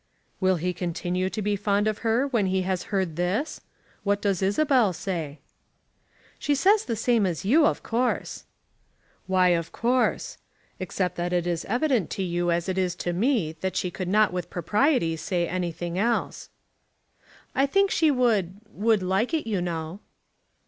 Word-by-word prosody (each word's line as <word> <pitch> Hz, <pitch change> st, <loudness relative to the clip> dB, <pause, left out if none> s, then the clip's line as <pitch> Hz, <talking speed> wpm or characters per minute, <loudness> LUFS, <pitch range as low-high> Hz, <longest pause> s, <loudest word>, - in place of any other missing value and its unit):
"Will 185 Hz, -1 st, +3 dB
he 180 Hz, +2 st, -2 dB
continue 180 Hz, +1 st, -2 dB
to 215 Hz, +1 st, -4 dB
be 205 Hz, 0 st, +1 dB
fond 205 Hz, +1 st, +1 dB
of 215 Hz, -1 st, -1 dB
her 230 Hz, +4 st, +1 dB
when 230 Hz, -8 st, +1 dB
he 185 Hz, 0 st, 0 dB
has 185 Hz, -1 st, -2 dB
heard 190 Hz, -6 st, -1 dB
this? 200 Hz, -, -1 dB, 0.4 s
What 200 Hz, 0 st, +1 dB
does 200 Hz, -3 st, 0 dB
Isabel 225 Hz, +1 st, +3 dB
say?" 165 Hz, -4 st, -4 dB, 1.0 s
"She 290 Hz, -, +1 dB
says 395 Hz, +9 st, +3 dB
the 230 Hz, -, -2 dB
same 225 Hz, -2 st, +2 dB
as 180 Hz, +1 st, -4 dB
you, 300 Hz, +8 st, +5 dB
of -, -, -2 dB
course." 245 Hz, +2 st, -1 dB, 0.8 s
"Why 185 Hz, -1 st, +4 dB
of 170 Hz, -1 st, 0 dB
course; 245 Hz, +2 st, 0 dB, 0.4 s
except 185 Hz, 0 st, -2 dB
that 175 Hz, +1 st, -2 dB
it 175 Hz, -1 st, +1 dB
is 170 Hz, -2 st, -2 dB
evident 245 Hz, -, +1 dB
to 195 Hz, -, -1 dB
you 175 Hz, -1 st, -1 dB
as 170 Hz, +1 st, 0 dB
it 190 Hz, 0 st, -1 dB
is 180 Hz, -1 st, 0 dB
to 175 Hz, -1 st, -3 dB
me 210 Hz, -, +1 dB
that 190 Hz, 0 st, -2 dB
she 180 Hz, -, -1 dB
could 185 Hz, +1 st, -5 dB
not 210 Hz, +1 st, +3 dB
with 175 Hz, -1 st, -4 dB
propriety 205 Hz, -, +1 dB
say 175 Hz, 0 st, -1 dB
anything 175 Hz, 0 st, -3 dB
else." 235 Hz, +3 st, -1 dB, 1.0 s
"I 270 Hz, +1 st, +2 dB
think 395 Hz, +6 st, +2 dB
she 320 Hz, -2 st, +3 dB
would, 220 Hz, -, +1 dB
would 215 Hz, -2 st, +1 dB
like 195 Hz, -, +1 dB
it, 315 Hz, -, -2 dB
you 200 Hz, -5 st, 0 dB
know." 165 Hz, +1 st, -4 dB
190 Hz, 170 wpm, -25 LUFS, 175-230 Hz, 1.0 s, you